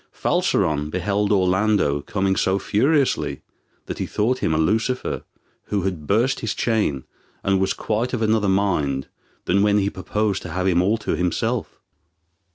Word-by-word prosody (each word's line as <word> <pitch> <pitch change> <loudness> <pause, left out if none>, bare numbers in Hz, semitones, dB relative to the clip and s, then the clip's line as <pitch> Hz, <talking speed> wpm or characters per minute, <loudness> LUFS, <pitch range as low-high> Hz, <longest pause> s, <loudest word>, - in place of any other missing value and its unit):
Falseron 75 -1 0
beheld 100 +4 0
Orlando 95 -5 +2
coming 95 +1 0
so 95 +1 +1
furiously, 135 +8 +1 0.4
that - - -6
he - - -2
thought 125 +5 0
him - - 0
a 80 - +1
Lucifer 110 +10 0 0.4
who 100 -3 -1
had 90 -6 -3
burst 120 +6 +2
his 110 -3 -3
chain, 105 - 0 0.4
and 95 -1 +2
was 95 - +1
quite 115 +3 -2
of 120 -3 -1
another 110 -2 +2
mind 85 -9 0 0.4
than 100 +3 +2
when 105 0 +3
he 100 0 +1
purposed 105 +1 -1
to 90 - -7
have 90 +1 -1
him 90 -2 +3
all 105 +5 +2
to 110 - -2
himself. 90 -1 -2
100 Hz, 160 wpm, -22 LUFS, 90-110 Hz, 0.4 s, when